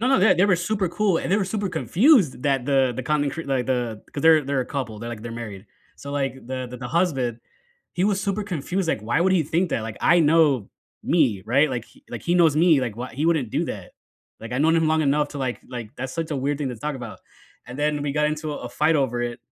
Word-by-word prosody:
No, 245 - +1
no, 270 - +4
yeah, 210 +4 +5
they 180 +3 +3
were 185 -4 +3
super 190 +2 -1
cool, 195 -1 +1
and - - -4
they 200 - +4
were 205 - +1
super 200 +1 -2
confused 180 - +3
that 135 -3 +1
the 135 -2 +2
the 130 - -3
content 145 +1 0
cr 165 - -4
like, 135 -4 -1
the 120 -4 -2
the - - -24
'cause 140 - -5
they're 160 -2 +6
they're 140 -1 0
a 125 - -3
couple, 120 -7 -4
they're, 120 +1 -6
like, 110 -2 -7
they're 120 0 -6
married- 110 -4 -8 0.3
so, 140 - -9
like, 135 -3 -1
the 130 0 -4
the 125 - -7
the 125 0 -6
husband, 135 -7 0 0.5
he 180 - 0
was 200 -2 +1
super 200 +1 -1
confused, 180 0 -3
like, 135 - 0
"Why 120 +8 0
would 185 +2 +3
he 180 -4 +3
think 165 +4 0
that? 115 - -1
Like, 110 -1 -7
I 170 +1 +5
know" 150 -8 +3 0.3
me, 130 - +2
right? 140 +6 +3
Like, 120 -3 -3 0.3
h 120 - -6
he 175 - +1
knows 165 -4 +4
me. 160 -4 +5
Like, 120 -4 -3
"Why 125 0 -6
he 145 +4 -2
wouldn't 155 -9 +1
do - - 0
that. - - -7 0.5
Like, 115 +1 -8
I've 125 - -1
known 160 +1 +4
him 165 -1 +2
long 160 0 +2
enough 145 +1 +1
to, 145 - -7
like-" 130 -3 -3
like, 120 -4 -7
that's 130 0 -5
such 165 -1 -3
a 145 - -1
weird 140 +2 -1
thing 140 -3 -2
to 125 - -7
talk 150 +6 -4
about, 120 -4 -9 0.5
and 125 +3 -9
then 150 0 0
we 145 -1 -2
got 150 0 +1
into 155 0 -3
a - - -5
a - - -6
fight 155 +4 +2
over 125 -4 0
it, 120 -1 -4
145 Hz, 270 wpm, -23 LUFS, 125-165 Hz, 0.5 s, they're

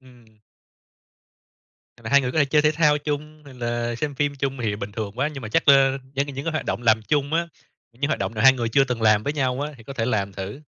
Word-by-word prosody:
ừm. 125 -2 -19 1.7
Và 115 -2 -8
2 140 +2 +5
người 125 -1 -2
có - - -3
thể 145 - +4
chơi 150 +2 +3
thể 150 0 +3
thao 150 -1 +3
chung, 150 +1 -5
rồi 140 -2 -13
là 120 -1 -3
xem 145 +3 -3
phim 145 +1 -1
chung 135 0 -3
thì 105 -3 -1
bình 105 0 -6
thường 105 -1 -4
quá, 140 +3 +1
nhưng 135 - -7
mà 110 - -6
chắc, 165 - +2
a, 135 -1 +5 0.2
những 140 +2 -1
những 140 +1 -6
cái 165 - -1
hoạt 155 - -3
động - - -2
làm 110 -1 +4
chung 145 +5 -1
á, 170 +1 +1 0.4
những 130 +5 -3
hoạt 155 - -1
động 95 +3 -2
nào 110 - -1
2 135 0 +8
người 120 -3 -2
chưa 135 +4 +4
từng 125 -3 -3
làm 110 -1 +4
với 145 - -2
nhau 130 -2 -1
á 150 - -3
thì 115 - -15
có 135 - -8
thể 115 -4 -2
làm 100 -5 -1
thử. 100 +9 -7
135 Hz, 270 wpm, -23 LUFS, 115-145 Hz, 1.7 s, 2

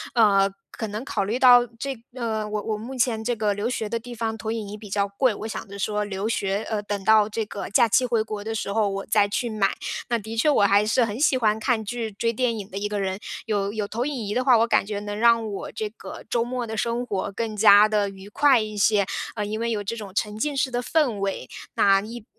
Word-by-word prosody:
嗯， 200 -4 +4 0.2
可 220 - -5
能 215 +5 -5
考 200 - -1
虑 220 +5 -1
到 245 -1 +7
这 275 +3 -3 0.2
嗯， 220 -4 -3
我 210 -1 -1
我 220 - -2
目 230 +5 -7
前 235 -3 0
这 240 +1 0
个 210 -2 0
留 205 +4 -2
学 225 -4 -2
的 230 +1 -2
地 240 +1 -9
方 225 -1 -2
投 220 0 -4
影 225 -3 -4
仪 205 - -6
比 210 -1 -11
较 200 0 0
贵， 225 +5 +1
我 220 - -6
想 220 - -6
着 200 - -9
说 210 +1 -1
留 200 0 -3
学， 200 -2 -1
呃， 215 -2 -2
等 205 -1 -4
到 215 +1 +5
这 220 +1 -2
个 205 - -6
假 230 +3 +4
期 240 +4 +3
回 235 -3 +1
国 215 -2 -6
的 225 +1 -4
时 200 -2 -3
候， 215 -2 +2
我 195 0 -4
再 210 -1 +3
去 230 +4 -2
买。 210 -3 +1 0.4
那 235 - +2
的 220 +1 -7
确 265 +7 +3
我 280 - +4
还 200 +1 +4
是 230 +3 +2
很 210 +2 -5
喜 275 -3 +3
欢 215 -2 +1
看 220 -2 0
剧， 225 0 -4
追 230 +3 -1
电 235 -1 0
影 200 -2 -6
的 195 - -5
一 205 - -1
个 205 -1 -2
人， 190 0 -2 0.3
有 205 -3 -1
有 210 -1 -3
投 235 +5 -2
影 295 - -3
仪 205 - -3
的 255 - 0
话， 250 -3 +6
我 225 - +4
感 - - +3
觉 205 -1 -3
能 205 0 -5
让 230 -1 +4
我 200 - -6
这 215 - -3
个 - - -10
周 235 -1 +1
末 245 0 -3
的 220 -1 -5
生 235 +3 -1
活 195 -4 -3
更 225 -2 -3
加 210 0 +7
地 210 -2 +1
愉 195 0 -12
快 275 +1 +4
一 215 -1 -4
些。 205 -1 +3 0.3
嗯， 210 -2 -2
因 215 - -3
为 235 0 -1
有 210 -2 -2
这 205 +3 -3
种 205 -3 -7
沉 210 0 -1
浸 290 +5 -1
式 265 -1 0
的 245 0 -1
氛 265 -7 +1
围， 195 -9 -3 0.3
那 195 -1 +5
一 225 +1 -9
220 Hz, 285 characters per minute, -24 LUFS, 205-235 Hz, 0.4 s, 到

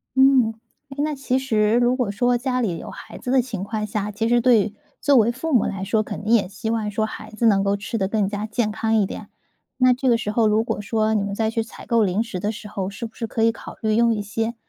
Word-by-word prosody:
嗯， 265 -4 +5 0.4
诶， 280 +1 -4
那 305 0 -1
其 265 -1 0
实 220 -5 +1
如 245 +1 +3
果 250 -6 -1
说 245 +4 +2
家 255 0 -1
里 185 -8 -1
有 - - -8
孩 - - -10
子 250 - -4
的 260 -1 +5
情 230 -6 -5
况 215 +1 -3
下， 210 0 -3
其 220 +2 -1
实 240 +1 +3
对 220 -4 +3 0.3
作 285 - +4
为 230 0 +4
父 295 +6 -4
母 240 - +4
来 195 -1 -3
说， 215 +3 +1
肯 205 - -7
定 220 +2 +1
也 215 -5 +4
希 195 +3 -5
望 225 -2 -1
说 215 +1 -1
孩 215 - -8
子 220 +2 -2
能 200 -3 +4
够 200 0 +1
吃 225 +3 -4
得 190 -3 0
更 205 -1 0
加 205 +1 -3
健 215 0 -1
康 220 +1 0
一 210 -2 +3
点。 - - -7 0.5
那 255 -1 +5
这 255 +1 0
个 235 - +4
时 215 -2 -3
候 220 0 +3
如 215 +1 +2
果 230 - -3
说 220 +1 0
你 210 -2 +1
们 200 0 -3
再 220 +1 0
去 225 0 -1
采 220 - -12
购 230 -2 +3
零 200 +2 +1
食 230 -6 -6
的 205 +4 -1
时 210 -1 -9
候， 195 -2 -4
是 200 +3 -6
不 225 - -9
是 230 - -4
可 225 - -1
以 230 - +5
考 225 - -10
虑 215 -1 +1
用 230 0 +4
一 210 - -2
些 225 +3 -3
220 Hz, 300 characters per minute, -22 LUFS, 210-240 Hz, 0.5 s, 嗯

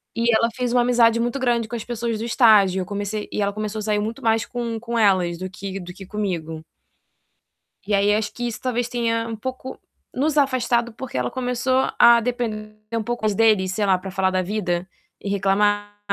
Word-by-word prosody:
E 235 0 +2
ela 230 - +3
fez 250 -2 -1
uma 245 - +4
amizade 235 -2 +4
muito 240 +3 -1
grande 240 -3 +1
com 240 - -6
as 230 - -4
pessoas 235 -1 -3
do 225 - -4
estágio. 210 -6 +4
Eu - - -4
comecei 205 +2 -4
e - - -2
ela 200 0 0
começou 215 0 -4
a - - -4
sair 210 -1 0
muito 220 +2 -4
mais 225 -1 +2
com 235 -2 -4
com 235 0 -4
elas 185 -5 +3
do 185 0 -5
que 195 +1 -6
do 180 0 -8
que 195 - -11
comigo. 175 -6 -4 1.3
E 210 - 0
aí, 200 +1 +3
acho 210 -1 -1
que 240 0 -4
isso, 230 - -5
talvez, 245 -1 -1
tenha 230 -1 -1
um 225 - -4
pouco 260 +3 -6 0.4
nos 300 +3 0
afastado, 245 -4 +1
porque 250 - -7
ela 125 -1 -1
começou 255 +1 0
a 235 0 +7
depender 220 -3 -3 0.2
um 230 -1 0
pouco 240 +1 -4
mais 210 -2 +2
dele, 215 -3 +3
sei 200 +2 -1
lá, 190 -1 +4
para 190 +1 -7
falar 190 0 +1
da 185 0 0
vida 185 -2 -2 0.3
e - - -4
reclamar. 205 +1 +1
220 Hz, 210 wpm, -22 LUFS, 200-240 Hz, 1.3 s, a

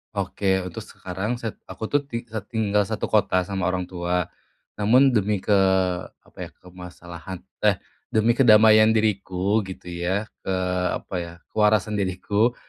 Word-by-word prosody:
Oke, 95 -1 0
untuk 90 -2 -7
sekarang, 95 +6 -5
set 115 -3 -6
aku - - -9
tuh 145 - +4
ti 115 -3 -4
eee, 110 -3 -6
tinggal 105 -3 0
satu - - -3
kota 95 0 +3
sama 95 -1 -2
orang 90 0 -1
tua. 90 0 -2 0.6
Namun 130 +6 +5
demi 105 -3 +1
ke - - -1 0.7
apa - - -26
ya, - - -16
kemasalahan 90 -1 -10 0.2
eh 105 -2 +5 0.3
demi 110 +2 +2
kedamaian 110 -3 +6
diriku 100 -1 +1
gitu 90 -1 -9
ya, 90 +4 -1 0.2
ke 95 - -3 0.4
apa - - -7
ya, 85 -1 -6 0.2
kewarasan 105 -1 +2
diriku, 100 +5 0
100 Hz, 145 wpm, -24 LUFS, 90-110 Hz, 0.7 s, kedamaian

